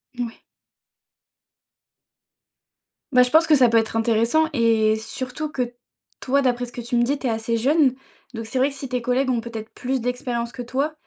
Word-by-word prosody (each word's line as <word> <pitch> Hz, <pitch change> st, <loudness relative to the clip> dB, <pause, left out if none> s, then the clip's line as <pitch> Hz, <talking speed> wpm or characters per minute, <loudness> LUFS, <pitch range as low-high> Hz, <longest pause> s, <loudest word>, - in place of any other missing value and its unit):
Moui. 240 Hz, -2 st, -5 dB, 2.7 s
Bah, 250 Hz, -2 st, +6 dB
je 250 Hz, -, -1 dB
pense 320 Hz, +1 st, +5 dB
que 310 Hz, -, +6 dB
ça 255 Hz, -4 st, +5 dB
peut 230 Hz, -, +3 dB
être 225 Hz, 0 st, 0 dB
intéressant 230 Hz, +7 st, +2 dB
et 225 Hz, -3 st, +3 dB
surtout 255 Hz, +6 st, -5 dB
que 250 Hz, -4 st, -3 dB, 0.5 s
toi, 275 Hz, +2 st, +1 dB
d'après 245 Hz, -1 st, 0 dB
ce -, -, -12 dB
que 245 Hz, -, -7 dB
tu 235 Hz, +1 st, -3 dB
me 240 Hz, -, +3 dB
dis, 280 Hz, +4 st, 0 dB
tu 275 Hz, -, -8 dB
es -, -, +2 dB
assez 225 Hz, +1 st, -1 dB
jeune. 270 Hz, +2 st, +3 dB, 0.4 s
Donc, 225 Hz, 0 st, -5 dB
c'est 240 Hz, +4 st, -2 dB
vrai 265 Hz, +2 st, +3 dB
que 280 Hz, -, -10 dB
si 270 Hz, 0 st, -6 dB
tes 250 Hz, -1 st, -2 dB
collègues 255 Hz, +2 st, +1 dB
ont 235 Hz, -2 st, 0 dB
peut-être 225 Hz, -1 st, -8 dB
plus 260 Hz, +1 st, -2 dB
d'expérience 245 Hz, -1 st, -3 dB
que 245 Hz, -, -7 dB
toi, 270 Hz, +5 st, -2 dB
245 Hz, 195 wpm, -23 LUFS, 230-265 Hz, 2.7 s, Bah